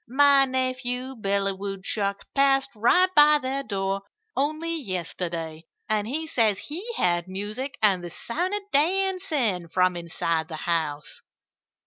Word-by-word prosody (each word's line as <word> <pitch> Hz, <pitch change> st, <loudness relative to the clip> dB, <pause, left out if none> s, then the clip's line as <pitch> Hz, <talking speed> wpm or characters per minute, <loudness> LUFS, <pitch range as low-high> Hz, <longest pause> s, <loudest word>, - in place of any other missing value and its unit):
My 275 Hz, +2 st, +6 dB
nephew, 255 Hz, 0 st, -2 dB
Billy 200 Hz, -2 st, 0 dB
Woodchuck, 200 Hz, +1 st, -3 dB
passed 275 Hz, -1 st, +3 dB
right 360 Hz, -, +3 dB
by 300 Hz, 0 st, +7 dB
their 270 Hz, 0 st, -2 dB
door 195 Hz, -5 st, -2 dB, 0.3 s
only 310 Hz, +4 st, -1 dB
yesterday; 170 Hz, -, -4 dB, 0.2 s
and 215 Hz, -2 st, 0 dB
he 310 Hz, +6 st, -2 dB
says 225 Hz, -9 st, +2 dB
he 305 Hz, -, -5 dB
heard 175 Hz, 0 st, +1 dB
music 210 Hz, +9 st, -5 dB
and 190 Hz, -4 st, +4 dB
the 175 Hz, -, -5 dB
sound 350 Hz, -, -3 dB
of 415 Hz, -, -3 dB
dancing 310 Hz, -, +1 dB
from 180 Hz, +2 st, +2 dB
inside 165 Hz, -1 st, -2 dB
the 160 Hz, -, -6 dB
house." 155 Hz, -3 st, -2 dB
225 Hz, 130 wpm, -25 LUFS, 185-280 Hz, 0.3 s, by